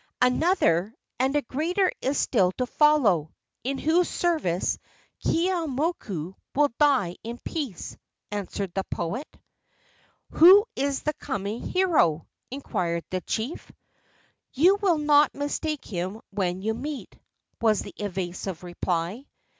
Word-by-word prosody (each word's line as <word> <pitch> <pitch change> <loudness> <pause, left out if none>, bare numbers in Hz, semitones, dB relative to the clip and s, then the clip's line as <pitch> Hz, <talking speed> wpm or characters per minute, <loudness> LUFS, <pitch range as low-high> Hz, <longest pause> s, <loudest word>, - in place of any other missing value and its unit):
"Another 250 - +2 0.2
and 265 +3 +1
a 295 - +2
greater 345 - 0
is 275 +2 0
still 190 -7 +2
to 250 - -1
follow, 245 - +3 0.3
in 270 +3 -2
whose 335 +5 +2
service 310 - 0 0.4
Keeaumoku 315 - -1 0.2
will 290 +1 +4
die 265 - +3
in 235 +1 -6
peace," 280 - -4 0.4
answered 200 -2 -4
the 195 - -1
poet. 175 - -4 1.0
"Who 385 +6 +8
is 275 0 -1
the 300 - 0
coming 205 -2 -4
hero?" 300 - +2 0.2
inquired 180 -11 -2
the 185 0 -1
chief. 230 - -4 0.8
"You 355 +9 +5
will 385 -5 +2
not 295 -1 +4
mistake 290 +1 -3
him 185 +3 -4
when 190 -2 -2
you 220 +1 0
meet," 285 +4 -6 0.5
was 220 -3 +3
the - - -9
evasive 185 -2 -4
reply. 175 +7 -3
250 Hz, 120 wpm, -26 LUFS, 185-300 Hz, 1.0 s, Who